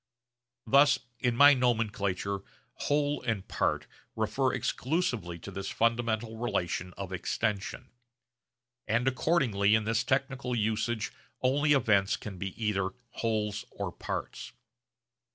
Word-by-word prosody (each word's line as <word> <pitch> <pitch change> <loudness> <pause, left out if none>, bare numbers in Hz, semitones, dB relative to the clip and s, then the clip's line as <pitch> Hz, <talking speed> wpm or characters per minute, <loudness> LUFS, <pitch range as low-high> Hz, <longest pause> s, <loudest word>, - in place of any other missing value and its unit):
Thus 140 0 +6 0.2
in 125 -2 +1
my 145 +3 +9
nomenclature 105 -6 0 0.3
'whole' 145 0 0
and 110 -6 -2
'part' - - 0 0.3
refer 110 +4 +1
exclusively 125 - -1
to 100 - -9
this 100 +1 -4
fundamental 115 -1 0
relation 90 -6 -2
of 95 -1 -6
extension; 105 +2 -2 1.0
and 120 +4 +1
accordingly 125 -7 +3
in 110 - +2
this 110 +1 +1
technical 135 -2 -1
usage 110 0 0 0.3
only 145 +3 +3
events 105 -7 +3
can 95 -4 -8
be 95 0 -5
either 100 -4 0 0.2
wholes 105 -3 -1
or - - -4
parts. - - -5
110 Hz, 115 wpm, -30 LUFS, 100-130 Hz, 1.0 s, my